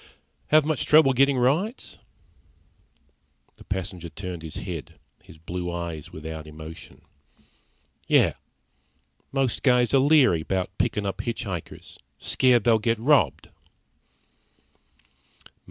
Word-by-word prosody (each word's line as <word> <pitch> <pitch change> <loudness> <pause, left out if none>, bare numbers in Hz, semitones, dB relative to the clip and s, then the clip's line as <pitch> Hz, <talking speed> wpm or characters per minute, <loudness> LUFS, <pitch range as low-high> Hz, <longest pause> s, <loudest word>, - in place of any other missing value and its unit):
"Have 155 -1 +4
much 155 -3 -1
trouble 150 -3 +6
getting 135 +1 +3
rides?" 160 - -1 1.6
The - - -15
passenger 95 -3 -5
turned 90 +1 -7
his 80 -1 -7
head, 85 -7 -7 0.2
his - - -16
blue 90 +2 -5
eyes 85 -3 -6
without 80 0 -8
emotion. 80 +1 -11 1.0
"Yeah. - - +4 1.0
Most 135 -3 -1
guys 125 -2 +3
are 135 - +6
leery 135 - +4
about 95 +3 -3
pickin' 105 -1 0
up 95 +1 -3
hitch 115 +1 -4
hikers. 95 -7 -8 0.2
Scared 125 -2 +2
they'll 115 -2 +4
get 115 +2 0
robbed." 120 - +2
105 Hz, 110 wpm, -25 LUFS, 85-130 Hz, 1.6 s, trouble